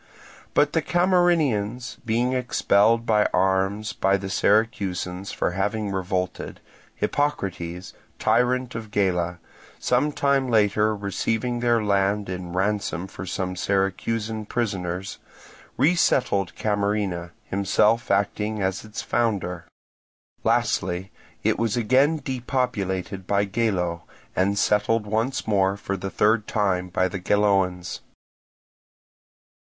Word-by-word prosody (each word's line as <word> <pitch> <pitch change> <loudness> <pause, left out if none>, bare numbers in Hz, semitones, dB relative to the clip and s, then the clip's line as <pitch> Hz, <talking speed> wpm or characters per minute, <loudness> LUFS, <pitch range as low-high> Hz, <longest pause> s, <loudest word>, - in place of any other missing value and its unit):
But 145 - +3
the 160 - +2
Camarinaeans 155 - +1
being 120 +3 +1
expelled 115 -2 +2
by 105 -2 +3
arms 95 +3 +1
by 100 -1 +2
the 95 0 -6
Syracusans 95 -3 0
for - - -1
having 100 +2 -1
revolted, 95 -1 -3 0.4
Hippocrates, 95 -11 -2 0.2
tyrant 125 +1 +1
of 115 -2 -6
Gela, 90 -4 0 0.4
some 130 +5 +1
time 140 -2 +1
later 105 -1 +3
receiving 110 +4 -2
their 120 -2 +2
land 100 0 +1
in 90 -1 -5
ransom 95 -1 -1
for 95 -1 -8
some 90 +1 -3
Syracusan 105 +3 -1
prisoners, 95 -5 -3 0.6
resettled 130 - +2
Camarina, 100 -4 -1
himself 105 +4 +1
acting 105 +2 0
as 95 -1 -1
its 110 +1 -6
founder. 95 -7 -1 0.8
Lastly, 90 +1 0 0.3
it - - +1
was 115 0 0
again 130 +7 +3
depopulated 115 - -2
by 100 0 +2
Gelo, 95 -5 -1 0.3
and 100 +2 +1
settled 105 +2 +2
once 110 +5 -1
more 100 -2 +2
for 100 -1 -3
the 95 0 -4
third 105 +3 +2
time 95 -4 0
by 95 +1 +1
the 95 +1 -5
Geloans. 95 -2 +1
105 Hz, 110 wpm, -24 LUFS, 95-115 Hz, 0.8 s, But